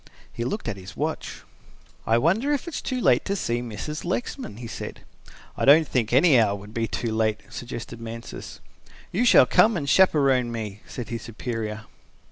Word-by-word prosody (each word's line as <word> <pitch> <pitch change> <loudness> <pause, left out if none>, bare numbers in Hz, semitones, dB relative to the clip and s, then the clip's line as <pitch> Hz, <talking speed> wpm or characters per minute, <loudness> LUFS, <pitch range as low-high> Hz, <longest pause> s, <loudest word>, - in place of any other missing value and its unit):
He 115 - -3
looked 165 - -3
at 110 -4 -3
his 95 +2 -11
watch. 155 +2 -4 0.6
"I 115 - +4
wonder 195 - +2
if 290 +3 -1
it 340 - -6
is - - -3
too 255 -1 -2
late - - +3
to 200 - -1
see 120 -10 -1
Mrs. 125 +6 -5
Lexman," 185 - -4
he 120 - -8
said. 120 +1 -7 0.5
"I - - -3
don't 150 +3 +7
think 120 -4 0
any 135 +1 +6
hour 105 -3 +2
would 100 +2 -11
be 115 0 -1
too 115 +1 -3
late," 110 -1 0
suggested 120 -1 -7
Mansus. 115 0 -8 0.5
"You 225 +7 +1
shall - - +7
come 220 -2 +4
and 145 -4 -3
chaperon 135 -8 +4
me," 110 -3 -5
said 120 -3 -7
his 115 -1 -4
superior. 110 -2 -5
120 Hz, 185 wpm, -25 LUFS, 110-160 Hz, 0.6 s, don't